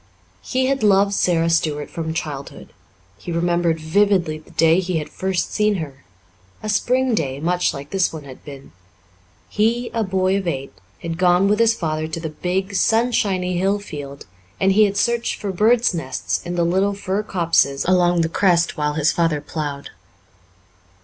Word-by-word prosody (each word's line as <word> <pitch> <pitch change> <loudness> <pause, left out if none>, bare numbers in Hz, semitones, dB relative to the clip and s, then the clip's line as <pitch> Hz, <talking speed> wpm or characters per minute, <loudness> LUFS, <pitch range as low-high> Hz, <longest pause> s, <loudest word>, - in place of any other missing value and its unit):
He 260 - -1
had 275 -1 0
loved 200 -1 +4
Sara 170 -4 +2
Stuart 155 -3 0
from 160 -1 -4
childhood. 145 -4 -6 0.5
He 175 - -7
remembered 170 -1 +1
vividly 175 -1 +1
the 155 - -20
day 165 +2 +3
he 185 -2 -1
had 150 -1 -4
first 190 +1 -2
seen 210 -1 +2
her 140 -6 -7 0.6
a 215 - -3
spring 250 +4 +1
day, 140 -9 -1
much 175 +3 +1
like 140 +1 -9
this 190 -2 +1
one 155 -2 -8
had 130 -2 -12
been; 140 -2 -11 0.8
he, 230 +3 0
a 230 - 0
boy 190 0 +1
of 195 -2 -4
eight, 135 -6 -3 0.3
had 165 0 -4
gone 180 +1 +4
with 210 +2 +2
his 230 -1 +4
father 155 -3 -2
to 160 +1 -5
the 160 -1 -4
big, 185 +5 -3
sunshiny 195 -4 +1
hill 195 +2 +1
field 145 -8 -8 0.3
and 195 - +3
he 210 +2 +5
had 200 0 -2
searched 235 +2 0
for 200 - -4
birds' 225 +4 +3
nests 95 - -3
in 175 - -4
the 170 -1 +1
little 190 +4 +1
fir 195 0 -2
copses 170 -8 +1
along 175 -1 +3
the 165 - +1
crest 170 0 +2
while 150 -2 -1
his 150 0 +2
father 165 -3 +1
plowed. 145 -1 -5
175 Hz, 175 wpm, -21 LUFS, 155-200 Hz, 0.8 s, he